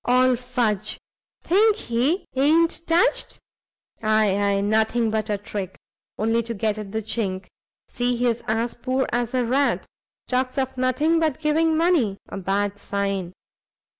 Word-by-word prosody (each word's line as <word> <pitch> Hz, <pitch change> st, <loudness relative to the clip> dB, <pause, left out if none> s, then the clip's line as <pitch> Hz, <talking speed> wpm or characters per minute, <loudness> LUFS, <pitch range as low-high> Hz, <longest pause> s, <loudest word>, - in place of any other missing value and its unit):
"All 255 Hz, +1 st, +4 dB
fudge! 235 Hz, -4 st, -1 dB, 0.5 s
think 420 Hz, +4 st, +4 dB
he 270 Hz, -, 0 dB
i'n't 325 Hz, +5 st, +2 dB
touched? 335 Hz, +2 st, +2 dB, 0.6 s
ay, 215 Hz, -2 st, +3 dB
ay; 200 Hz, 0 st, +1 dB
nothing 220 Hz, +2 st, +1 dB
but 220 Hz, 0 st, -1 dB
a 205 Hz, -, 0 dB
trick! 200 Hz, -2 st, -6 dB, 0.4 s
only 225 Hz, +2 st, +1 dB
to 230 Hz, 0 st, -5 dB
get 215 Hz, +1 st, -1 dB
at 205 Hz, -2 st, -7 dB
the 220 Hz, +1 st, -3 dB
chink: 195 Hz, -4 st, -2 dB, 0.4 s
see 245 Hz, 0 st, -1 dB
he's 240 Hz, -1 st, 0 dB
as 225 Hz, +2 st, 0 dB
poor 255 Hz, +2 st, -1 dB
as 240 Hz, +1 st, -1 dB
a 250 Hz, -1 st, +1 dB
rat, 270 Hz, +4 st, +1 dB, 0.4 s
talks 255 Hz, +1 st, -1 dB
of 265 Hz, -1 st, -1 dB
nothing 255 Hz, +6 st, +2 dB
but 315 Hz, -5 st, 0 dB
giving 315 Hz, +1 st, +2 dB
money; 320 Hz, -, +2 dB
a -, -, -6 dB
bad 200 Hz, +2 st, -1 dB
sign! 195 Hz, -3 st, -2 dB
235 Hz, 145 wpm, -23 LUFS, 210-265 Hz, 0.6 s, All